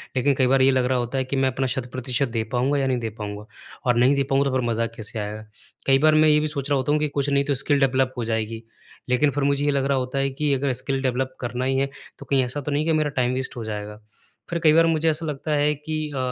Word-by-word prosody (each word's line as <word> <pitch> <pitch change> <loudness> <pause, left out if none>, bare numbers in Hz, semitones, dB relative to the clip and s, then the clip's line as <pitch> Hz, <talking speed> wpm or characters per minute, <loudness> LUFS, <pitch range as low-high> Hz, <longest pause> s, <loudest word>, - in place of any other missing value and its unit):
लेकिन 140 +2 +2
कई 130 -2 +3
बार 135 0 +3
ये 135 - +5
लग 130 -1 +2
रहा 130 0 +1
होता 120 +2 -2
है 130 - +1
कि 135 - -3
मैं 135 0 +2
अपना 130 +1 -1
शत-प्रतिशत 130 +1 -2
दे 115 -1 -1
पाऊँगा 130 +4 +1
या 135 - 0
नहीं 130 -1 +1
दे 115 -1 -3
पाऊँगा, 105 -1 -7 0.4
और 125 -1 +3
नहीं 130 +4 +4
दे 140 - +1
पाऊँगा 135 +1 +1
तो 130 - -2
फिर 120 -2 -1
मज़ा 115 0 0
कैसे 110 +1 -5
आएगा? 105 +1 -5 0.4
कई 135 0 +5
बार 155 +1 +4
मैं 155 0 +5
ये 150 0 +5
भी 155 - 0
सोच 145 -2 -4
रहा 140 - +3
होता 130 +3 0
हूँ 150 - +2
कि 150 - +1
कुछ 140 0 -1
नहीं 140 0 +2
तो 145 - +1
स्किल 145 -2 +2
डेवलप 130 -1 +2
हो 120 - -2
जाएगी, 110 0 -2 0.5
लेकिन 140 +3 +3
फिर 145 0 -2
मुझे 140 +1 +1
ये 145 - +3
लग 135 -1 0
रहा 140 -1 +1
होता 130 +1 -3
है 135 0 +1
कि 140 +1 -1
अगर 135 -1 0
स्किल 135 -1 -1
डेवलप 130 0 -1
करना 125 +1 -3
ही 135 0 +1
है 135 0 0 0.3
तो - - -10
कहीं 135 -2 +2
ऐसा 145 +4 -4
तो 145 - -4
नहीं 150 +2 0
है 165 - +1
कि 155 - +3
मेरा 150 -1 +1
टाइम 125 0 +1
वेस्ट 130 0 -2
हो 115 - -4
जाएगा। 105 0 -6 0.5
फिर 170 0 -1
कई 155 -2 +5
बार 165 +1 +5
मुझे 160 0 +2
ऐसा 160 +2 -1
लगता 150 0 -4
है 150 +1 +2
कि 155 +2 -6 0.2
अ - - -3
135 Hz, 295 wpm, -23 LUFS, 125-145 Hz, 0.5 s, ये